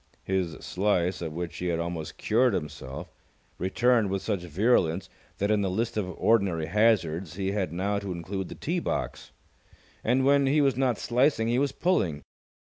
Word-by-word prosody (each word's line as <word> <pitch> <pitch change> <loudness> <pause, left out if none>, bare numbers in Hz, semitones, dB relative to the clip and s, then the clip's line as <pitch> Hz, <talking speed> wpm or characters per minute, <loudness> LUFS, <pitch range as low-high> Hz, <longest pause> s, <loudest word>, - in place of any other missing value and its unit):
His 95 -3 -1
slice, 90 -2 0
of 80 -2 -3
which 85 +1 -5
he 90 - -3
had 85 -1 0
almost 85 -2 -4
cured 120 0 +2
himself, 70 -4 -6 0.5
returned 115 +4 +2
with 95 0 -2
such 100 -5 -1
virulence 90 0 +1 0.3
that 100 +2 0
in 105 -1 +3
the 95 - 0
list 110 +5 -1
of 105 -4 -1
ordinary 100 -8 +2
hazards 90 -4 +1
he 95 0 -1
had 100 -5 -1
now 100 +4 -1
to 100 -2 -5
include 90 +2 -4
the - - -7
tee - - -2
box. - - -3 0.7
And, 130 +3 +2
when 140 0 +4
he 145 +3 +3
was 135 -4 +3
not 125 -3 +1
slicing, 120 -2 +2
he 120 +2 +2
was 140 -1 +1
pulling. 95 - 0
100 Hz, 175 wpm, -27 LUFS, 85-115 Hz, 0.7 s, when